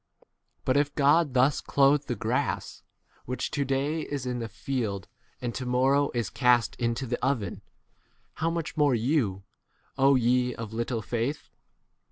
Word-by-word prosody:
But 130 +1 +2
if 145 0 +1
God 145 0 +3
thus 130 +3 +3
clothe 140 +1 +3
the 120 - -1
grass, 125 +7 -2 0.4
which 125 +1 -3
to 145 - 0
day 140 +4 -1
is 145 -4 -4
in 125 -1 -2
the 115 -1 -4
field 110 -4 -3 0.3
and 120 -2 -3
to 130 +1 -4
mor 125 +2 +3
row 140 0 +3
is 120 -2 -1
cast 125 -3 +3
into 120 +2 -1
[the] 120 0 -3
oven, 110 -8 -1 0.8
how 165 - +2
much 165 -2 -3
more 145 -4 +3
you, 115 -6 0 0.6
ye 125 -2 +3
of 110 -1 -7
little 115 0 -2
29 - - -21 0.3
faith - - -24
125 Hz, 160 wpm, -27 LUFS, 120-140 Hz, 0.8 s, God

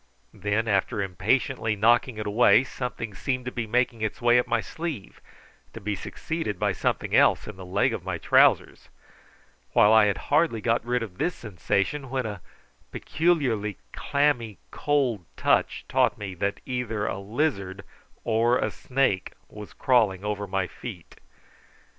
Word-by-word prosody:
Then 105 +3 -1
after 100 +2 0
impatiently 110 +4 0
knocking 120 +2 +3
it 105 - -4
away, 105 +2 +5
something 125 -4 -5
seemed 125 +5 -3
to 125 - -4
be 115 -3 -4
making 120 0 0
its 110 -1 -2
way 120 0 +4
up 125 - -1
my 120 - +1
sleeve, 150 - -6 0.5
to - - -8
be 105 +1 -3
succeeded 110 - -4
by - - +1
something - - -1
else - - +4
in 105 - -7
the 95 - -10
leg 95 +3 +1
of - - -5
my - - -3
trousers, - - +3 0.8
while 105 +1 +6
I 110 -1 +7
had 100 -2 +1 0.2
hardly 150 -7 +3
got 115 +1 0
rid 120 0 -1
of 95 -5 -10
this 180 - 0
sensation 110 +6 -2
when 130 -1 -2
a 105 -4 -5 0.5
peculiarly 130 - 0 0.2
clammy 140 -7 0
cold 135 -9 0
touch - - +1
taught - - +2
me 100 -2 -6
that 100 +3 -3
either 120 -5 -2
a 95 - -3
lizard 100 -4 -2 0.4
or 115 +2 +2
a - - -1
snake 125 -8 -1 0.2
was 105 -1 -10
crawling 105 -7 +1
over 105 -1 -3
my 95 0 -1
feet. 90 -2 -10
110 Hz, 155 wpm, -26 LUFS, 100-125 Hz, 0.8 s, I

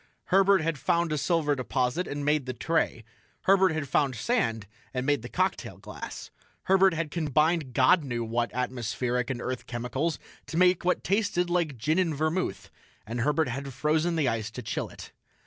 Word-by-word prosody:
Herbert 195 -1 +5
had 160 -2 -1
found 170 +4 +1
a - - +1
silver 155 -1 +1
deposit 130 - -1
and 145 0 -4
made 150 -3 +1
the 130 - -3
tray. 125 -4 0 0.4
Herbert 190 -1 +4
had 155 -3 -3
found 135 -1 +1
sand 115 - 0 0.3
and 125 0 -1
made 145 0 +2
the - - -8
cocktail - - -1
glass. - - -8 0.3
Herbert 190 -1 +4
had 160 -2 -2
combined 155 -3 +1
God 165 +6 +5
knew 120 -4 -3
what 115 +1 -1
atmospheric 125 0 -2
and 130 -3 -2
earth 130 0 -4
chemicals 130 +7 -2 0.3
to 165 - -4
make 180 0 +4
what 180 +1 +1
tasted 195 -3 +1
like 165 -7 0
gin 155 +10 +1
and 165 -5 +1
vermouth, 155 +5 -2 0.3
and 120 +2 -3
Herbert 150 +2 +1
had 135 +3 -4
frozen 155 +5 +1
the 155 -5 +1
ice 115 -2 -1
to 125 +2 -8
chill - - -3
it. - - -11
150 Hz, 180 wpm, -28 LUFS, 125-170 Hz, 0.4 s, Herbert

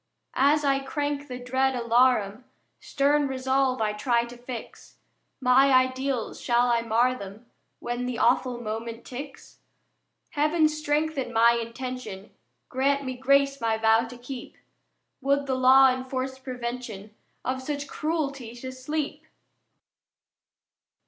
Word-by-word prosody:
As 295 +2 +4
I 275 -1 +3
crank 285 +1 -3
the 250 -2 -6
dread 260 +1 0
alarum 235 -2 +2 0.3
Stern 285 +1 +1
resolve 265 -2 0
I 210 -1 0
try 235 +2 +1
to 240 +1 -11
fix: 245 -1 -9 0.4
My 265 +1 +5
ideals, 255 -1 +1
shall 245 0 +2
I 235 -1 +2
mar 230 +2 +2
'em 215 -2 -8 0.3
When 240 +1 -4
the 250 -2 -3
awful 245 +1 +2
moment 230 +1 -5
ticks? 270 +2 -9 0.7
Heaven 305 +2 +3
strengthen 305 -3 -1
my 230 +1 +5
intention, 235 -3 -6 0.4
Grant 280 +2 +1
me 255 -1 -3
grace 275 +2 +2
my 225 -1 +1
vow 225 +1 +3
to 245 +1 -10
keep: 245 +1 -9 0.6
Would 280 +1 +1
the 270 - -1
law 260 +1 +6
enforced 260 0 -4
Prevention 235 -5 -6 0.3
Of 260 +1 -2
such 285 +1 -4
Cruelty 280 -8 -3
to 260 +2 -7
Sleep! 290 +4 -4
255 Hz, 125 wpm, -26 LUFS, 235-275 Hz, 0.7 s, law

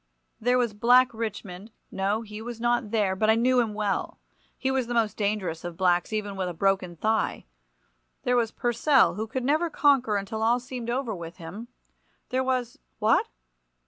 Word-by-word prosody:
There 245 +3 +2
was 240 -4 +1
Black 245 +4 +4
Richmond—no, 210 -1 -4
he 210 0 -8
was 235 0 -7
not 240 -1 +1
there, 205 -4 +1
but 215 +3 +1
I 220 - +6
knew 250 +2 +3
him 220 -3 0
well; 205 -2 -2 0.4
he 265 - -1
was 265 -3 0
the 240 - -3
most 225 -3 +1
dangerous 200 -6 -2
of 175 -1 -6
blacks, 180 0 +2
even 210 -2 -3
with 185 -2 -2
a 175 - -7
broken 190 -1 0
thigh. 220 +6 -1 0.8
There 250 - +2
was 235 -2 +2
Purcell, 245 +4 +3
who 220 +1 -4
could 255 +3 -3
never 310 +6 +1
conquer 275 -8 +3
until 200 +2 -4
all 235 +2 +3
seemed 250 -1 -6
over 245 -2 -1
with 170 -2 -8
him. 180 +8 -8 0.6
There 260 +1 0
was—what! 250 -3 0
225 Hz, 175 wpm, -26 LUFS, 200-245 Hz, 0.8 s, I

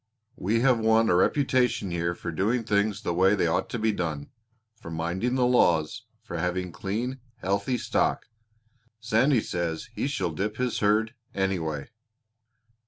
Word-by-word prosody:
We 115 +1 0
have 125 -2 +4
won 110 0 +3
a - - +4
reputation 125 -1 +2
here 85 0 -1
for 85 - -5
doing 110 +9 0
things 105 -1 0
the 85 - -1
way 95 +4 +4
they 95 - +1
ought 80 - 0
to - - -3
be 110 0 +1
done 80 -7 -4 0.4
for 95 - -11
minding 85 +9 -1
the 125 -1 +3
laws 85 -11 +2 0.2
for 85 - -5
having 90 +1 -2
clean, 120 +9 -3 0.2
healthy 100 +4 -1
stock. - - 0 0.7
Sandy 120 +3 +3
says 85 -4 -3
he - - -2
shall - - -1
dip 105 +2 -3
his 125 -2 -1
herd, 110 +2 +2 0.2
anyway." 85 -6 -2
100 Hz, 155 wpm, -27 LUFS, 85-115 Hz, 0.7 s, have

